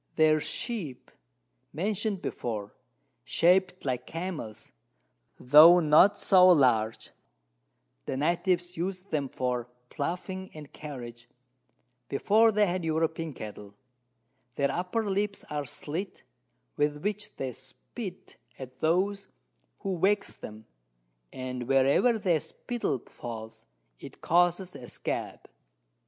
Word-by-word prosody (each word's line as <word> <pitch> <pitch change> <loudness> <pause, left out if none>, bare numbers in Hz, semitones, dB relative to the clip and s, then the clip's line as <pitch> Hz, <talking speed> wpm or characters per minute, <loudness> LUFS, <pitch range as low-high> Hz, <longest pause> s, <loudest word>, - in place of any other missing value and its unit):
Their 155 -1 +4
Sheep, 175 - -5 0.6
mention'd 200 +3 -2
before, 105 -4 -4 0.5
shap'd 180 +1 +2
like 125 -2 -2
Camels, 165 - -6 0.7
tho' 155 +7 +8
not 160 +5 +5
so 185 -2 +6
large: 125 -9 +3 1.0
The - - -2
Natives 175 +4 0
us'd 185 +2 -4
them 145 -4 -1
for 125 -2 -2 0.2
Ploughing 190 +2 -4
and 150 -2 -11
Carriage, 120 -5 -9 0.8
before 220 +10 +4
they 210 0 +3
had 180 -1 -2
European 160 0 -1
Cattle: 105 -3 -9 0.8
Their 140 -1 +1
upper 185 +8 -2
Lips 200 +1 -2
are 145 -1 -2
slit, 165 +8 -5 0.5
with 150 0 0
which 210 +1 -3
they 130 -2 -4
spit 185 - -10 0.2
at 130 -1 -10
those 195 +5 +1 0.5
who 190 -4 -3
vex 200 +3 +1
them, 110 0 -10 0.7
and 125 -1 -5
wherever 140 - +4
their 180 -6 +1
Spittle 235 - -4
falls, 115 -2 -9 0.3
it - - -11
causes 175 +1 +2
a 125 -3 -9
Scab. - - -5
165 Hz, 110 wpm, -28 LUFS, 130-190 Hz, 1.0 s, tho